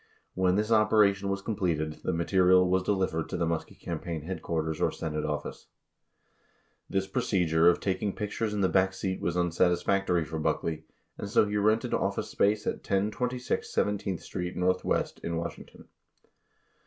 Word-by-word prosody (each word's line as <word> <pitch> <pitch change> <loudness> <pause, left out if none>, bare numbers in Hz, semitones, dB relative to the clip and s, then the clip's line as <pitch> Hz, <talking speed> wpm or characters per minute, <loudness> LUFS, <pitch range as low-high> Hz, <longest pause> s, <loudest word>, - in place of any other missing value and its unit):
When 90 0 +2
this 105 +2 0
operation 105 -2 +4
was 100 0 -2
completed, 85 -8 -1
the - - 0
material 90 +1 +4
was 95 +1 +2
delivered 95 -4 -1
to - - -3
the 85 - 0
Muskie 80 -1 -3
campaign 85 -1 -5
headquarters 80 -2 -3
or - - +2
Senate 75 -1 -3
office. 75 0 -4 1.2
This 95 0 0
procedure 85 -4 +2
of 85 - +2
taking 95 +1 -1
pictures 105 +1 -2
in 105 -1 -1
the 95 - +4
back 95 0 +2
seat 95 -1 -3
was 85 0 -1
unsatisfactory 90 0 +2
for 80 +1 -5
Buckley, 80 0 -1 0.3
and 100 - -4
so 105 0 +4
he 105 - -3
rented 110 +2 +2
office - - -1
space 105 +1 +1
at - - -1
1026 115 +6 -1
17th 100 -3 -1
Street 90 0 -5
NW. 90 0 0
in 85 -1 -2
Washington. 85 0 -7
95 Hz, 155 wpm, -28 LUFS, 85-100 Hz, 1.2 s, operation